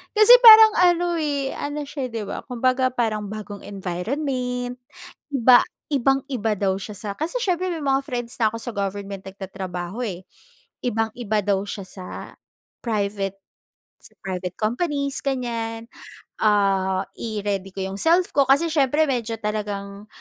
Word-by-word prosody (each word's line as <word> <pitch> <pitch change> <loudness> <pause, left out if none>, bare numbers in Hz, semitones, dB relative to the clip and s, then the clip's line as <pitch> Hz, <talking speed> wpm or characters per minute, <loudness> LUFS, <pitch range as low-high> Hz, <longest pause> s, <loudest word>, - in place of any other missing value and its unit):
kasi 430 +3 +8
parang 440 -1 +11
ano, 350 -1 +3
eh, 285 -3 -1
ano 290 +1 -4
siya, 275 -3 -5
'di 225 -2 -4
ba, - - -5
kumbaga 255 +1 +1
parang 220 -4 -1
bagong 210 -1 -7
environment, 245 - -3 0.6
iba 250 -2 +6 0.3
ibang-iba 270 -5 0
daw 190 -1 +1
siya 200 +2 -7
sa 205 +1 -6
kasi 345 +11 -3
siyempre 365 -3 0
may 325 - -4
mga 275 -1 +1
friends 240 -2 -4
na 220 -2 +2
ako - - -4
sa 230 0 -6
government 200 -1 -4
nagtatrabaho, 190 +2 -6
eh. 185 -4 -6 0.6
Ibang-iba 225 -1 -1
daw 195 -1 +1
siya 200 -1 -6
sa 185 - -10 0.8
private, 200 -3 -2 0.6
sa - - -15
private 185 -1 -4
companies 280 +5 -1
ganyan. 230 -4 -3 0.5
Ah, 195 -3 +2 0.2
i-ready 205 -3 -3
ko 195 - -4
'yong 190 +1 -5
self 345 +2 +3
ko 280 - +5
kasi 285 +5 +4
siyempre 295 0 +3
medyo 230 -3 -2
talagang 205 -1 -4
225 Hz, 140 wpm, -23 LUFS, 200-275 Hz, 0.8 s, parang